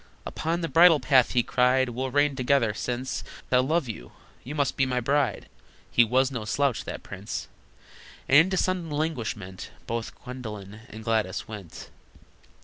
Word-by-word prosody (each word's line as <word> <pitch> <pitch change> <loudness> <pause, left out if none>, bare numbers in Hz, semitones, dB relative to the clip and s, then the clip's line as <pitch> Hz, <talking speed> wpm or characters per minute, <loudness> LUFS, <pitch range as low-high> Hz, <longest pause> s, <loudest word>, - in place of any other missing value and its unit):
"Upon 165 +2 -2
the 165 - -1
bridal 165 -1 +6
path," 130 -1 +3
he 120 -2 +3
cried, 125 +1 +2
"We'll 130 +2 -3
reign 145 +1 +2
together! 130 -4 +2
Since 125 +3 -3 0.3
I 125 - +5
love 145 +3 +1
you, 60 - -8 0.3
you 145 +5 -6
must 140 -3 0
be 135 - +2
my 125 -1 0
bride!" 140 +3 0 0.4
(He 120 - +6
was 130 +4 +2
no 120 -4 -4
slouch, 135 +3 0
that - - -6
prince!) 100 +2 -6 0.8
And 135 - +3
into 185 +5 +5
sudden 180 -2 0
languishment 120 - -3 0.2
Both 115 0 -4
Gwendolyn 110 -5 -8
and 110 0 -9
Gladys 110 -3 -1
went. 105 -6 -9
125 Hz, 155 wpm, -26 LUFS, 115-145 Hz, 0.8 s, bridal